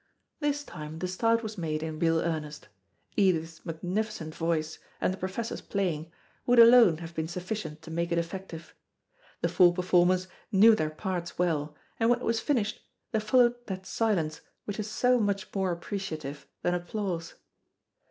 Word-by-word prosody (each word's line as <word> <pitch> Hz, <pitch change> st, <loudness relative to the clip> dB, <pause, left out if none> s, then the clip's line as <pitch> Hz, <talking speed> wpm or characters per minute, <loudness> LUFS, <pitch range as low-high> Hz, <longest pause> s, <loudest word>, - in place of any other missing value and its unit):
This 290 Hz, -1 st, 0 dB
time 155 Hz, -, -8 dB
the 185 Hz, -, -2 dB
start 230 Hz, +5 st, +1 dB
was 215 Hz, -2 st, -5 dB
made 155 Hz, -2 st, -2 dB
in 160 Hz, -1 st, -4 dB
real 165 Hz, -1 st, +3 dB
earnest. 155 Hz, -3 st, -4 dB, 0.5 s
Edith's 165 Hz, -5 st, +1 dB
magnificent 180 Hz, 0 st, -3 dB
voice, 160 Hz, -1 st, -1 dB, 0.2 s
and -, -, +1 dB
the -, -, -7 dB
Professor's 190 Hz, +5 st, -4 dB
playing, 170 Hz, -5 st, -2 dB, 0.4 s
would 245 Hz, 0 st, +4 dB
alone 230 Hz, -7 st, +8 dB
have 165 Hz, 0 st, -8 dB
been 160 Hz, -1 st, -2 dB
sufficient 175 Hz, -3 st, -5 dB
to 165 Hz, -, -9 dB
make 170 Hz, +1 st, -1 dB
it 170 Hz, -, +1 dB
effective. 170 Hz, -1 st, -5 dB, 0.7 s
The -, -, +2 dB
four 175 Hz, -1 st, +5 dB
performers 180 Hz, 0 st, +3 dB, 0.2 s
knew 215 Hz, +3 st, +7 dB
their 155 Hz, -8 st, 0 dB
parts 175 Hz, +1 st, -4 dB
well, 155 Hz, -4 st, 0 dB, 0.2 s
and 225 Hz, 0 st, +3 dB
when 245 Hz, -, +4 dB
it 245 Hz, -, -7 dB
was 230 Hz, 0 st, +1 dB
finished, 225 Hz, -6 st, 0 dB, 0.3 s
there 220 Hz, -, +1 dB
followed 240 Hz, +2 st, +3 dB
that 190 Hz, -2 st, -5 dB
silence 185 Hz, -7 st, 0 dB, 0.2 s
which 205 Hz, +1 st, -5 dB
is 210 Hz, 0 st, -3 dB
so 250 Hz, +3 st, +3 dB
much 205 Hz, -1 st, -1 dB
more 190 Hz, -2 st, 0 dB
appreciative 160 Hz, -6 st, -5 dB, 0.2 s
than 175 Hz, -, +2 dB
applause. 175 Hz, -1 st, -3 dB
180 Hz, 160 wpm, -29 LUFS, 165-215 Hz, 0.7 s, alone